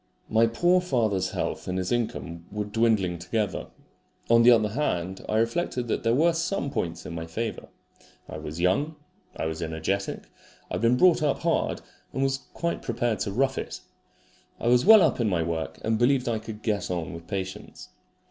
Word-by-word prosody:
My 115 Hz, +1 st, +5 dB
poor 175 Hz, +10 st, +3 dB
father's 110 Hz, -, 0 dB
health -, -, -3 dB
and 90 Hz, 0 st, -2 dB
his 95 Hz, -1 st, -2 dB
income 90 Hz, -8 st, -3 dB
were 105 Hz, 0 st, -3 dB
dwindling 105 Hz, -5 st, +1 dB
together. 100 Hz, +3 st, -2 dB, 0.6 s
On 115 Hz, 0 st, +7 dB
the 120 Hz, -, +7 dB
other 110 Hz, -3 st, +5 dB
hand, 95 Hz, -7 st, -2 dB
I 110 Hz, -, +1 dB
reflected 120 Hz, +2 st, 0 dB
that -, -, 0 dB
there 115 Hz, +1 st, +2 dB
were 165 Hz, +5 st, +4 dB
some 165 Hz, -3 st, -1 dB
points 85 Hz, -1 st, -3 dB
in -, -, -6 dB
my 80 Hz, 0 st, -5 dB
favour. 110 Hz, +8 st, -4 dB, 0.6 s
I -, -, -7 dB
was 75 Hz, +2 st, -7 dB
young. 100 Hz, -, +1 dB, 0.4 s
I -, -, -2 dB
was 80 Hz, 0 st, -3 dB
energetic. 80 Hz, +5 st, -2 dB, 0.5 s
I -, -, -4 dB
had -, -, -1 dB
been 115 Hz, +2 st, +4 dB
brought 180 Hz, +2 st, +5 dB
up 150 Hz, -2 st, +1 dB
hard, 165 Hz, 0 st, 0 dB, 0.3 s
and 135 Hz, -, 0 dB
was 135 Hz, 0 st, +1 dB, 0.2 s
quite 170 Hz, 0 st, -2 dB
prepared 115 Hz, -3 st, -1 dB
to 100 Hz, -, -2 dB
rough 135 Hz, +5 st, +1 dB
it. -, -, -6 dB, 0.8 s
I 120 Hz, -, 0 dB
was 125 Hz, +7 st, +4 dB
well 220 Hz, -3 st, +9 dB
up -, -, +2 dB
in 115 Hz, -3 st, +2 dB
my 85 Hz, -4 st, +1 dB
work, 80 Hz, -1 st, -3 dB
and 110 Hz, 0 st, +1 dB
believed 125 Hz, +1 st, +3 dB
I 115 Hz, -2 st, 0 dB
could 110 Hz, -1 st, -9 dB
get 105 Hz, -4 st, -1 dB
on 85 Hz, -3 st, -3 dB
with 85 Hz, 0 st, -10 dB
patients. 95 Hz, -, -6 dB
110 Hz, 190 wpm, -26 LUFS, 90-125 Hz, 0.8 s, well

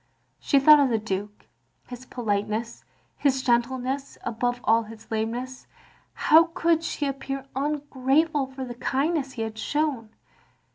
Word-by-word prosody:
She 280 Hz, -, +2 dB
thought 300 Hz, +2 st, +8 dB
of 280 Hz, -2 st, +3 dB
the 230 Hz, -, +2 dB
Duke, 205 Hz, -1 st, -5 dB, 0.4 s
his 250 Hz, +1 st, -10 dB
politeness, 220 Hz, 0 st, -3 dB, 0.3 s
his 265 Hz, -2 st, +1 dB
gentleness, 260 Hz, +2 st, 0 dB
above 245 Hz, +1 st, -1 dB
all 225 Hz, +1 st, +4 dB
his 225 Hz, +1 st, -12 dB
lameness. 240 Hz, +4 st, -3 dB, 0.5 s
How 325 Hz, +2 st, +6 dB
could 330 Hz, -1 st, +2 dB
she 300 Hz, -, -2 dB
appear 275 Hz, 0 st, -4 dB
ungrateful 285 Hz, +1 st, 0 dB
for 265 Hz, 0 st, -7 dB
the 245 Hz, -, -6 dB
kindness 275 Hz, +3 st, -1 dB
he 225 Hz, -, -3 dB
had 220 Hz, 0 st, -6 dB
shown? 285 Hz, -4 st, -1 dB
260 Hz, 135 wpm, -25 LUFS, 225-280 Hz, 0.5 s, thought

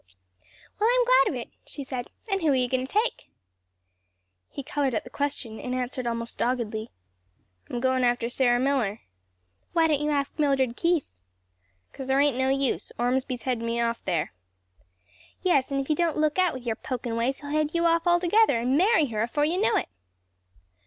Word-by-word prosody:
"Well, 435 Hz, +2 st, +3 dB
I'm -, -, +3 dB
glad -, -, +5 dB
of -, -, -3 dB
it," -, -, -9 dB
she 285 Hz, -, -7 dB
said, 255 Hz, -2 st, -5 dB, 0.2 s
"and 390 Hz, -2 st, 0 dB
who 325 Hz, -, +1 dB
are -, -, +3 dB
you 250 Hz, -1 st, +2 dB
going 260 Hz, +1 st, -1 dB
to -, -, -12 dB
take?" 435 Hz, +4 st, -1 dB, 1.2 s
He 280 Hz, -, -7 dB
colored 285 Hz, -4 st, -1 dB
at -, -, -1 dB
the 245 Hz, -, -12 dB
question 265 Hz, -6 st, -3 dB
and 250 Hz, 0 st, -3 dB
answered 250 Hz, 0 st, -3 dB
almost 230 Hz, 0 st, -3 dB
doggedly, 230 Hz, -3 st, -1 dB, 0.8 s
"I'm 240 Hz, -, -3 dB
going 260 Hz, 0 st, +1 dB
after 240 Hz, -1 st, +1 dB
Sarah 245 Hz, 0 st, +2 dB
Miller." 250 Hz, -6 st, 0 dB, 0.7 s
"Why 330 Hz, -1 st, +4 dB
don't 300 Hz, -3 st, +2 dB
you 300 Hz, -, 0 dB
ask 280 Hz, -2 st, 0 dB
Mildred 270 Hz, -5 st, +2 dB
Keith?" 320 Hz, -, -1 dB, 0.7 s
"'Cause 265 Hz, -, -7 dB
there 270 Hz, +1 st, +2 dB
ain't 285 Hz, -2 st, +3 dB
no 260 Hz, +1 st, +1 dB
use; 275 Hz, -1 st, 0 dB
Ormsby's 250 Hz, 0 st, -1 dB
headed 245 Hz, -3 st, -1 dB
me 230 Hz, 0 st, -1 dB
off 235 Hz, 0 st, -1 dB
there." 165 Hz, -, -1 dB, 1.1 s
"Yes; 285 Hz, -7 st, +2 dB
an' 275 Hz, -, 0 dB
if 270 Hz, -, -3 dB
you 305 Hz, -, +2 dB
don't 335 Hz, -1 st, 0 dB
look 305 Hz, +2 st, +1 dB
out, 365 Hz, -5 st, +2 dB
with 255 Hz, -, -7 dB
yer 230 Hz, -, 0 dB
pokin' 240 Hz, 0 st, -4 dB
ways, 240 Hz, +4 st, 0 dB
he'll 285 Hz, 0 st, -7 dB
head 305 Hz, +1 st, 0 dB
you 340 Hz, 0 st, +2 dB
off 335 Hz, +1 st, +2 dB
altogether, 350 Hz, -, +4 dB
and 250 Hz, +3 st, +1 dB
marry 370 Hz, +1 st, +4 dB
her 220 Hz, -5 st, -3 dB
afore 290 Hz, +6 st, +1 dB
you 350 Hz, +5 st, 0 dB
know 440 Hz, -, +3 dB
it." -, -, 0 dB
265 Hz, 195 wpm, -26 LUFS, 240-310 Hz, 1.2 s, glad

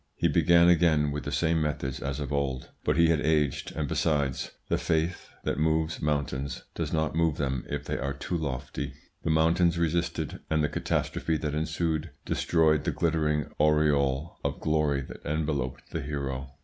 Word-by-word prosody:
He -, -, +2 dB
began 85 Hz, 0 st, +5 dB
again 80 Hz, -4 st, +4 dB
with 75 Hz, 0 st, -4 dB
the 70 Hz, -, -3 dB
same 80 Hz, +3 st, +2 dB
methods 75 Hz, -4 st, -2 dB
as 70 Hz, +1 st, -3 dB
of 75 Hz, 0 st, -3 dB
old; 70 Hz, -2 st, -2 dB
but -, -, +1 dB
he 85 Hz, -1 st, +5 dB
had 80 Hz, -2 st, +3 dB
aged, 75 Hz, -2 st, +1 dB
and, 75 Hz, -2 st, -1 dB
besides, 70 Hz, -3 st, 0 dB, 0.2 s
the -, -, +1 dB
faith 80 Hz, +2 st, -1 dB
that -, -, -1 dB
moves 80 Hz, 0 st, +1 dB
mountains 70 Hz, -3 st, -1 dB
does -, -, -3 dB
not 80 Hz, -1 st, 0 dB
move 80 Hz, -2 st, +2 dB
them 65 Hz, -3 st, -1 dB
if -, -, -3 dB
they -, -, -2 dB
are 70 Hz, +1 st, -2 dB
too 80 Hz, +5 st, -3 dB
lofty. 70 Hz, -2 st, -3 dB, 0.3 s
The -, -, -2 dB
mountains 85 Hz, +2 st, +3 dB
resisted, 85 Hz, 0 st, -1 dB
and 80 Hz, -1 st, +2 dB
the 75 Hz, -, +1 dB
catastrophe 80 Hz, -1 st, -1 dB
that 75 Hz, -1 st, -3 dB
ensued 80 Hz, +1 st, -1 dB, 0.2 s
destroyed 80 Hz, -3 st, +2 dB
the -, -, 0 dB
glittering 75 Hz, -3 st, 0 dB
aureole 75 Hz, -1 st, +2 dB
of -, -, -2 dB
glory 75 Hz, -3 st, +1 dB
that -, -, -10 dB
enveloped 75 Hz, -4 st, -2 dB
the 80 Hz, -, -2 dB
hero. 70 Hz, -2 st, -4 dB
75 Hz, 175 wpm, -28 LUFS, 70-80 Hz, 0.3 s, began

